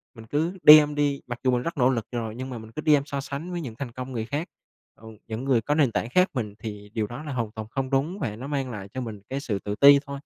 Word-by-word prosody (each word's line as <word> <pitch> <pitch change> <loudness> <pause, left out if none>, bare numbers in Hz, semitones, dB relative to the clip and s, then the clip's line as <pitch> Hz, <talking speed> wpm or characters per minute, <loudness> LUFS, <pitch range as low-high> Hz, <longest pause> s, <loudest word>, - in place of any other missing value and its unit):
Mình 115 - -11
cứ 160 +10 -1
đem 150 -1 +9
đi 145 -1 0
mặc 120 -1 -5
dù 130 - +3
mình 125 - +1
rất 170 -2 -4
nỗ 125 0 +4
lực 115 -4 -1
rồi, 115 -2 -4
nhưng 130 +1 -6
mà 125 - -5
mình 110 0 -11
cứ 155 - -5
đem 150 -3 +4
so 140 -1 -4
sánh 145 +6 -6
với 175 - -3
những 120 -8 -7
thành 125 -2 -6
công 130 +2 -7
người 115 -3 -3
khác, 145 +7 -3 0.5
ừ, 110 - -13 0.2
những 110 +2 -4
người 125 -4 +3
có 145 +6 0
nền 140 -7 +3
tảng 115 - -2
khác 185 +6 +3
mình, 110 -7 -3
thì 105 -3 -7
điều 110 -2 -1
đó 120 +7 -8
là 150 - -5
hoàn 115 -4 -2
toàn 110 -1 -7
không 130 +2 -3
đúng, 145 +8 0
và 110 -9 -3
nó 130 +5 -7
mang 135 -3 -2
lại 100 -3 -7
cho 130 - -3
mình 110 -4 -6
cái 135 - -2
sự 105 -8 -3
tự 105 +1 -4
ti 140 +2 +8
thôi. 140 - -10
130 Hz, 300 wpm, -25 LUFS, 115-145 Hz, 0.5 s, đem